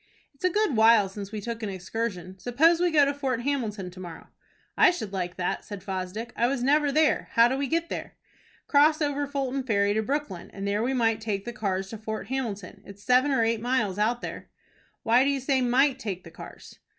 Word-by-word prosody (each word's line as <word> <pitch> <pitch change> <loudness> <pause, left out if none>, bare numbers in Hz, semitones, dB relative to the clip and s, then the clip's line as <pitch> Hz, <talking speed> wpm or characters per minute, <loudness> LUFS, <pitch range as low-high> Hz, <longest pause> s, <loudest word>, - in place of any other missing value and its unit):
"It's 275 - -21
a 365 - +4
good 415 - +1
while 220 -2 +6
since 200 0 -8
we 215 -1 -5
took 230 +2 -5
an 215 - -3
excursion. 190 -1 -5
Suppose 315 - +3
we 355 0 +3
go 300 -3 +5
to 280 - 0
Fort 265 -4 -2
Hamilton 220 -9 -2
to 185 - -13
morrow." 175 -3 -9 0.5
"I - - +6
should 220 - -4
like 180 -2 -3
that," 180 - -2
said 200 -3 -8
Fosdick. 195 +4 -5
"I 235 - +2
was 255 -1 -1
never 290 +2 +3
there. 310 +2 +2
How 230 +1 +6
do 255 - -1
we 275 0 -1
get 335 +3 -1
there?" - - -6 0.5
"Cross 305 +2 +4
over 290 0 -1
Fulton 275 -1 -2
Ferry 205 -5 +1
to 220 - +1
Brooklyn, 255 -7 -3
and 200 0 -4
there 205 +1 0
we 260 +3 0
might 225 -2 +1
take 205 -3 -3
the 240 - -5
cars 195 -3 -2
to 225 - -7
Fort 220 +1 -5
Hamilton. 225 -8 -4
It's 200 0 -13
seven 255 +3 +4
or 265 -5 +2
eight 225 -1 0
miles 225 -6 0
out 235 +3 +1
there." - - -7 0.5
"Why 240 +3 +4
do 280 - +2
you 280 -1 0
say 265 0 +1
'might' 260 +2 +3
take 190 -7 -5
the 165 - -12
cars?" - - -12
235 Hz, 225 wpm, -26 LUFS, 200-275 Hz, 0.5 s, while